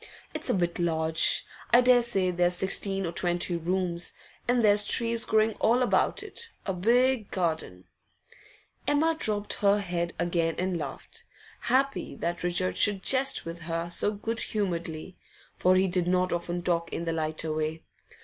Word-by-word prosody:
It's - - 0
a - - +2
bit 175 -2 -1
large; 160 -2 +2 0.2
I 240 - +6
daresay 240 -7 +3
there's 175 0 +1
sixteen 195 +1 +2
or 170 - -3
twenty 175 0 0
rooms. 175 0 -1 0.3
And 245 -2 +2
there's 205 0 +4
trees 230 +1 -1
growing 220 0 +2
all 245 +3 +3
about 245 - +1
it; 465 0 -5 0.2
a 195 - -1
big 235 +4 +2
garden 160 - -3 0.5
' - - -28
Emma 315 +3 +2
dropped 210 -8 -1
her 200 0 +4
head 175 -3 -3
again 170 -2 0
and 185 0 -1
laughed, 145 -5 -7 0.3
happy 265 +3 0
that 175 0 -3
Richard 175 +1 -1
should 200 -2 +3
jest 270 0 +3
with 165 +1 -7
her 165 +1 -4
so 175 - +1
good 225 +2 -3
humouredly; 175 -4 -3 0.4
for 185 +1 +3
he 190 +1 +3
did 175 -1 0
not 180 0 +1
often 175 0 -3
talk 170 -1 -1
in 170 - -4
the 165 - -1
lighter 155 0 -2
way. 155 +1 -3
180 Hz, 160 wpm, -27 LUFS, 170-215 Hz, 0.5 s, I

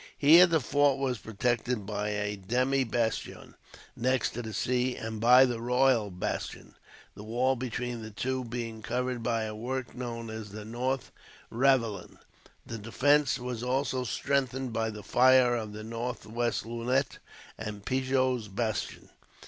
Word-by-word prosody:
Here 165 +5 +8
the 165 -2 +2
fort 145 0 +2
was 130 -4 -1
protected 120 0 -1
by 105 0 -2
a 105 0 -2
demi 125 +7 +1
bastion, 115 -2 -2 0.4
next 130 +2 +1
to 120 - -5
the 110 -2 -6
sea; 125 +4 0
and 110 -1 -5
by 125 +3 +8
the 120 -3 -3
Royal 125 -3 +3
Bastion, 90 -1 -5 0.4
the - - -11
wall 125 +4 +1
between 120 -1 -4
the 110 - -7
two 130 +5 -2
being 115 -2 -5
covered 125 +3 -2
by 115 -1 0
a 110 0 -4
work 125 +3 -4
known 115 -2 -5
as 110 -1 -7
the 105 +1 -8
North 125 +4 -2 0.4
Ravelin. 115 -6 +1 0.5
The 115 - -6
defence 140 +6 +2
was 125 -2 -5
also 130 +1 0
strengthened 130 0 -1
by 110 0 0
the 105 -1 -8
fire 125 -1 +5
of 110 -3 -4
the 105 +1 -8
northwest 115 0 -3
lunette, 120 +4 -1 0.4
and 105 -2 -7
Pigot's 130 -3 0
Bastion. 105 -2 -3
120 Hz, 150 wpm, -29 LUFS, 110-130 Hz, 0.5 s, Here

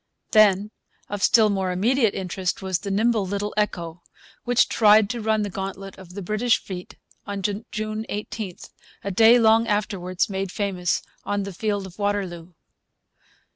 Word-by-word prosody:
Then, 210 -1 +4 0.4
of 205 -1 -4
still 215 +1 +5
more 190 -2 -1
immediate 225 +4 +2
interest 185 0 -3
was 185 -2 -1
the 200 - -6
nimble 220 +2 +2
little 200 +2 -3
Echo, 175 -5 -2 0.4
which 245 0 +3
tried 215 -1 +5
to 240 -2 -4
run 220 0 +1
the 205 - -3
gauntlet 195 0 -6
of 180 -1 -13
the 200 - -5
British 215 +5 +2
fleet 180 -2 -8 0.3
on 200 -1 -4 0.3
June 215 0 -4
18, 205 -2 -5 0.5
a 200 - -3
day 225 +5 +6
long 225 0 +4
afterwards 200 -4 -1
made 195 -1 -3
famous 185 -4 -1 0.2
on 205 0 -1
the 200 0 -6
field 205 +1 -2
of 190 +1 -13
Waterloo. 185 -4 -2
200 Hz, 155 wpm, -24 LUFS, 190-215 Hz, 0.5 s, day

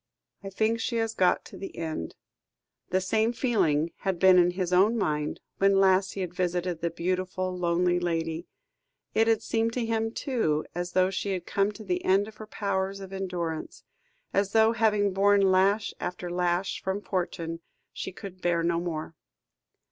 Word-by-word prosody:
"I 195 - -5
think 220 +4 0
she 235 - -2
has 225 -1 0
got 185 -4 +2
to - - -11
the 195 - -8
end." 160 - -4 0.7
The 185 - +2
same 220 +4 +1
feeling 170 - +1
had 190 -3 -2
been 185 0 +6
in 175 0 +5
his 180 0 -2
own 205 +6 +4
mind 150 -6 -1 0.2
when 195 0 +4
last 190 0 +3
he 195 - -4
had 180 -2 -4
visited 180 -1 -1
the 170 - 0
beautiful, 185 +2 -2
lonely 175 0 +1
lady; 165 -1 -2 0.7
it 225 +1 +3
had 225 -1 +2
seemed 225 0 0
to 245 -1 -1
him, 225 0 0
too, 225 - -1
as 175 +1 -4
though 185 0 +3
she 195 +1 -2
had 180 -2 -4
come 200 +1 +1
to 215 - -10
the 180 -3 -2
end 195 +2 +3
of 220 - -12
her 215 - -9
powers 195 -2 -2
of 195 -1 -9
endurance 175 -4 -4 0.5
as 200 0 +1
though, 220 0 +5
having 210 -3 +2
borne 200 0 +4
lash 200 +3 +2
after 180 0 -4
lash 180 +1 0
from 190 +2 -2
fortune, 165 -3 -3 0.3
she - - -5
could 185 -1 -10
bear 170 -1 +1
no 170 0 +1
more. 165 -2 -4
185 Hz, 180 wpm, -27 LUFS, 175-205 Hz, 0.7 s, been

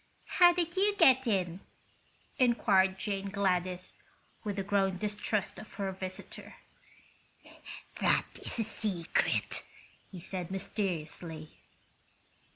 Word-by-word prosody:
"How 350 -1 +9
did 345 -1 -1
you 405 +2 +3
get 260 -7 +6
in?" 185 -4 0 0.8
inquired 195 -6 +4
Jane 200 -1 -2
Gladys, 185 -2 0 0.5
with 205 -2 -3
a 195 - 0
growing 195 -1 +1
distrust 210 0 -2
of 215 - -11
her 195 -2 -2
visitor. 185 0 -7 1.4
"That - - +3 0.2
is - - -4
a 225 - +2
secret," 200 -6 0 0.5
he 185 - -8
said, 180 0 -4
mysteriously. 170 -5 -4
195 Hz, 105 wpm, -31 LUFS, 185-215 Hz, 1.4 s, How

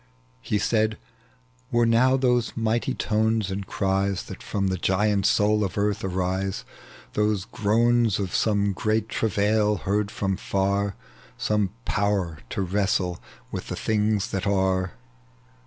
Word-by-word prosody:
He 105 - -1
said, 110 0 +1 0.7
"Were 120 0 +3
now 125 +3 +4
those 125 -3 +1
mighty 115 +3 0
tones 110 -2 +1
and 95 0 -4
cries 95 -1 0
That - - -9
from 100 -2 -1
the 95 - -1
giant 100 +2 +2
soul 105 +1 +3
of 95 - -3
earth 105 0 0
arise, 95 +1 -2 0.5
Those 105 -2 +1
groans 115 +1 +2
of 95 -3 -3
some 100 -2 +2
great 110 +2 0
travai! 105 -1 +1
heard 100 +1 0
from 95 -3 -2
far, 100 +1 0 0.4
Some 105 -2 +1 0.2
power 95 -6 0
at - - -7
wrestle 95 -2 0 0.3
with - - -5
the - - -4
things 105 -2 0
that 95 +1 -2
are. 95 -2 +1
100 Hz, 135 wpm, -25 LUFS, 95-110 Hz, 0.7 s, now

